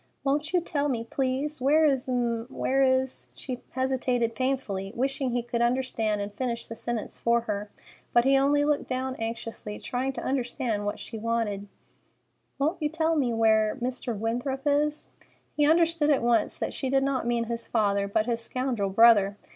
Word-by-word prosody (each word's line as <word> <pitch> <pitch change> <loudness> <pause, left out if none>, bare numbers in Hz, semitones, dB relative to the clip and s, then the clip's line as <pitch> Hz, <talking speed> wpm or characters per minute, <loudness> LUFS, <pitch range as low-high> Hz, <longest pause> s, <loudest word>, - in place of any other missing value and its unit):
"Won't 290 +2 0
you 360 -1 +2
tell 290 -3 -1
me—please—where 270 +5 +1
is—m'—where 255 -1 0
is——" 260 0 +1
She 255 -3 -6
hesitated 255 -3 0
painfully, 225 -7 -2
wishing 270 +1 -1
he 240 -1 -1
would 235 - +1
understand 235 -4 0
and 200 0 -5
finish 235 +1 -3
the - - -7
sentence 230 0 -4
for 235 0 +2
her; 210 -2 -4 0.4
but 240 0 +4
he 270 0 +5
only 285 +2 +3
looked 295 -1 0
down 260 0 -2
anxiously, 225 -2 -5
trying 255 +2 -2
to - - -6
understand 245 -5 -1
what 205 - -2
she 225 - -7
wanted. 215 -3 -1 0.9
"Won't 315 +5 0
you 300 - +1
please 320 - -12
tell 325 0 +2
me 265 -6 +1
where—Mr. 225 +2 +1
Winthrop 245 +5 -2
is?" 295 +1 +1 0.5
He 295 0 +3
understood 330 -2 +3
at 280 -5 +3
once 235 -1 +2
that - - -3
she 265 - -3
did 270 0 +3
not 270 -3 0
mean 235 -1 +1
his 230 0 -4
father, 200 -3 +1
but 215 +2 +1
his 235 -1 0
scoundrel 250 -6 -1
brother. 205 -1 +5
250 Hz, 165 wpm, -27 LUFS, 230-275 Hz, 0.9 s, he